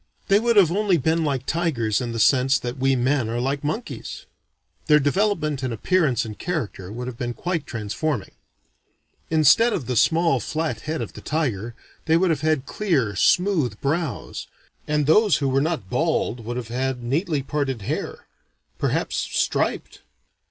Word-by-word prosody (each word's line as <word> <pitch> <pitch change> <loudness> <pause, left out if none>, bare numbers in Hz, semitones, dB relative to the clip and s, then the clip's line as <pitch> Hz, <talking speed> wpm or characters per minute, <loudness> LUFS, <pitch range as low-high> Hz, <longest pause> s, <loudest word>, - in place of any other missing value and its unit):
They 200 +1 +5
would 235 +1 +1
have 190 -6 +6
only 200 -1 +2
been 160 +3 +1
like 135 -4 -1
tigers 135 -11 0
in 120 -1 -3
the 115 - -4
sense 130 +3 +4
that 125 0 -5
we 135 +1 +3
men 130 -1 +1
are 120 +1 -2
like 135 +3 -1
monkeys. 215 +11 -5 0.6
Their 150 -1 +6
development 150 -2 0
in 130 -2 -2
appearance 130 - +1
and 110 -2 -8
character 120 - -4
would 120 +3 -5
have 125 -2 -7
been 120 -1 -3
quite 175 -5 -3
transforming. 115 - -3 1.0
Instead 160 - +5
of 155 - -2
the 125 - -2
small 165 +3 +3
flat 155 -1 -2
head 160 - -1
of - - -8
the - - -10
tiger, 120 -8 -2 0.3
they 160 0 +4
would 180 0 +2
have 150 -3 -1
had 155 -4 +1
clear 140 - 0
smooth 165 - +2
brows; 145 - -3 0.4
and 150 -1 +1
those 205 +6 +4
who 140 - -1
were 135 +1 +2
not 155 - -2
bald 115 0 0
would 120 +2 -4
have 120 -2 -5
had 130 0 -2
neatly 145 +3 -1
parted 135 -6 -2
hair - - -4 0.5
perhaps - - -1
striped. - - -1
140 Hz, 165 wpm, -23 LUFS, 120-165 Hz, 1.0 s, have